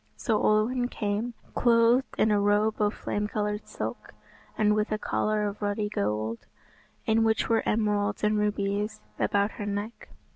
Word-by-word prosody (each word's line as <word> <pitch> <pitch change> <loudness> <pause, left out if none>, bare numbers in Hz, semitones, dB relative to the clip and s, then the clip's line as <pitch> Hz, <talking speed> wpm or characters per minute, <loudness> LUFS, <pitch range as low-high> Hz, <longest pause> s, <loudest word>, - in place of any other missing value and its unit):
So 220 -3 0
Olwen 240 +4 +2
came, 220 +1 -2 0.2
clothed 235 +2 +3
in 215 - +3
a 205 - +3
robe 205 +2 +2
of 205 0 +3
flame 210 0 -2
coloured 210 0 -2
silk, - - -6 0.4
and 210 -1 +3
with 210 0 0
a 215 - +1
collar 215 0 0
of 205 +1 -6
ruddy 205 0 -1
gold, 110 - -2 0.7
in 225 0 +3
which 220 0 +1
were 225 -1 +3
emeralds 205 -2 0
and 210 0 +3
rubies, 205 - -1 0.2
about 200 +1 +1
her - - -2
neck. 205 +3 -5
210 Hz, 155 wpm, -27 LUFS, 205-220 Hz, 0.7 s, clothed